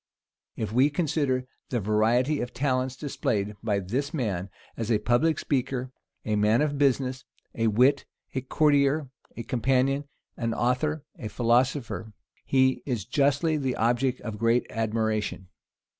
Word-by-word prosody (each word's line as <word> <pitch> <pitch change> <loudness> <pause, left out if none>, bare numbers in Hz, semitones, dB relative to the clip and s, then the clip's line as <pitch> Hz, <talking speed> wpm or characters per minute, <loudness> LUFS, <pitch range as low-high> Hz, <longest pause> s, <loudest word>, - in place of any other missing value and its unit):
If 110 -2 -3
we 130 +4 +5
consider 145 -5 0 0.2
the 120 - 0
variety 115 +7 +2
of 120 - -5
talents 130 -1 0
displayed 105 -8 -2
by 105 -3 0
this 125 - -2
man, 100 - -2 0.3
as 115 0 -3
a 110 - +4
public 120 +9 +2
speaker, 130 -2 -1 0.3
a 110 - 0
man 105 +6 +3
of 145 -2 -1
business, 130 -2 +1 0.3
a 115 0 0
wit, 125 +6 +3 0.3
a 130 - -1
courtier, 145 +1 +2 0.3
a 115 - -4
companion, 135 +4 +1 0.3
an 115 -1 -1
author, 140 +5 0
a 110 - -4
philosopher, 120 0 0 0.3
he 130 -1 +2
is 120 -8 -3
justly 145 +5 +2
the 130 -3 -1
object 120 +3 +1
of 110 -3 -6
great 115 +2 +2
admiration. 110 -4 -1
125 Hz, 140 wpm, -27 LUFS, 115-140 Hz, 0.3 s, we